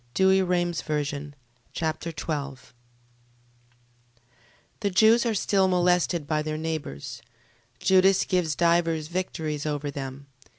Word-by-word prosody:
2 190 0 +4
Machabees 150 -5 -2 0.4
Chapter 160 +1 -3
12 140 -5 -5 2.1
The 205 - 0
Jews 220 +5 +4
are 225 - 0
still 195 -1 +2
molested 180 -3 +2
by 150 +1 0
their 155 0 -3
neighbours. 155 -5 -5 0.6
Judas 190 +5 +4
gains 175 -5 0
divers 165 -2 +1
victories 160 -4 -3
over 145 -1 -2
them. 135 0 -7
160 Hz, 100 wpm, -26 LUFS, 150-185 Hz, 2.1 s, 2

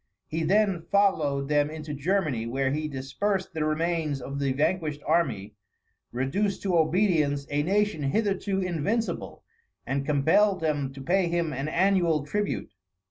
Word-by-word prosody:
He 160 +1 -3
then 195 +1 +2
followed 155 -9 +2
them 145 0 +2
into 155 -1 -6
Germany, 145 - 0
where 135 +2 0
he 155 +2 -1
dispersed 185 +9 -2
the 160 -2 -1
remains 155 -1 0
of 140 +2 -6
the 140 -1 0
vanquished 150 +1 -1
army, 135 - 0 0.6
reduced 185 +11 -1
to 190 -3 +1
obedience 160 -4 +2
a 145 0 +1
nation 205 +1 +1
hitherto 195 +5 0
invincible, 185 +6 -2 0.4
and 135 0 -1
compelled 160 +8 +3
them 145 -4 -1
to 135 0 -9
pay 185 +4 +2
him 170 -2 -1
an 135 +3 -3
annual 170 -3 +2
tribute. 205 +7 -2
155 Hz, 140 wpm, -27 LUFS, 140-190 Hz, 0.6 s, compelled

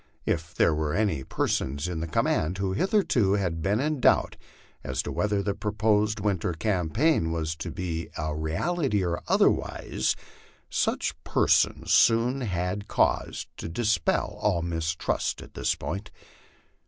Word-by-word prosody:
If 80 +1 -2
there 80 - +4
were 75 -1 -1
any 100 -11 0
persons 70 +4 -1
in 90 -2 -3
the 80 - -3
command 80 +2 0
who 95 -1 -1
hitherto 125 - +2
had 90 -5 -1
been 100 +6 +1
in 150 +1 0
doubt - - +3 0.5
as 65 0 -2
to - - -4
whether 105 -1 0
the 100 - 0
proposed 105 +1 +1
winter 95 -4 0
campaign 95 - +1
was 80 -1 -2
to 85 - -5
be 85 -1 -4
a 75 0 -2
reality 105 - 0
or 85 0 -2
otherwise, 65 - +1 0.6
such - - 0
persons - - +2
soon 120 +4 +4
had 95 -2 -2
cause - - 0
to - - -5
dis 105 +1 +1
pel 105 +5 -1
all 100 -6 +1
mistrust 80 -1 -1
on - - -11
this - - 0
point. 100 +6 -5
95 Hz, 145 wpm, -27 LUFS, 80-105 Hz, 0.6 s, there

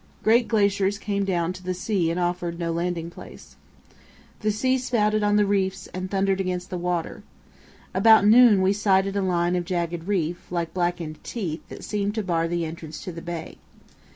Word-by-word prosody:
Great 235 +3 +4
glaciers 200 -2 +2
came 200 -1 -2
down 180 -2 0
to 185 - -11
the 185 0 -3
sea 185 -2 0
and 170 +2 -1
offered 175 -1 -2
no 170 -1 -2
landing 170 0 -2
place. - - -13 0.8
The 215 -1 0
sea 255 +5 +1
spouted 215 -4 +1
on 205 0 +2
the 210 0 +4
reefs 195 -1 0
and 185 0 -4
thundered 195 0 +1
against 180 0 -3
the 180 - -3
shore. 175 -1 -2 0.7
About 220 -2 +6
noon 220 -3 +7
we 190 +1 +3
sighted 195 -1 +2
a 200 - +1
line 175 -1 +1
of 180 - 0
jagged 170 -2 -3
reef, 175 -4 -2
like 170 -2 -2
blackened 175 -3 -2
teeth, 175 -9 -4
that - - -9
seemed 205 0 -2
to 220 - -1
bar 165 -3 0
the 170 0 -1
entrance 160 -1 -8
to 185 - -5
the 165 0 -8
bay. 170 -1 -6
185 Hz, 185 wpm, -24 LUFS, 175-205 Hz, 0.8 s, noon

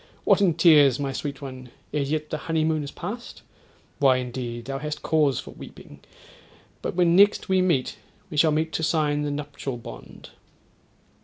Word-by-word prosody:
What - - +4
in 180 -5 +3
tears, 150 -6 +5
my 135 -1 -2
sweet 140 0 -5
one, 130 -2 -8 0.2
ere 150 - 0
yet 150 +2 -2
the - - -2
honeymoon 160 -1 +1
is 140 - -6
past? 235 +10 -8 0.6
Why! 135 -3 +4
indeed 120 -2 -5
thou 135 +1 -4
hast 150 0 -5
cause 150 -5 +2
for - - -9
weeping: 70 - -13 0.8
but - - -4
when 175 -1 +3
next 200 +1 +4
we 190 -1 +3
meet 170 -9 0 0.3
we - - -6
shall 155 +2 +4
meet 160 +1 -1
to - - -1
sign 150 -2 +1
the 150 - -2
nuptial 145 -3 -5
bond.' - - -11
150 Hz, 170 wpm, -25 LUFS, 135-160 Hz, 0.8 s, tears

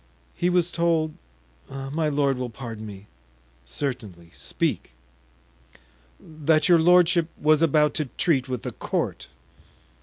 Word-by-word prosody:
"He 175 - 0
was 180 -1 +1
told—my 135 - -3
lord 140 -3 +1
will 125 -1 -3
pardon 115 -2 -8
me——" 100 -1 -10 0.6
"Certainly, 100 - -5
speak." - - -3 1.3
"That 155 0 0
your 175 -2 +6
lordship 175 0 +4
was 155 +1 +3
about 150 -2 +3
to 155 - -1
treat 135 -6 +1
with 125 -2 -4
the - - -4
court." - - -3
145 Hz, 115 wpm, -24 LUFS, 115-160 Hz, 1.3 s, your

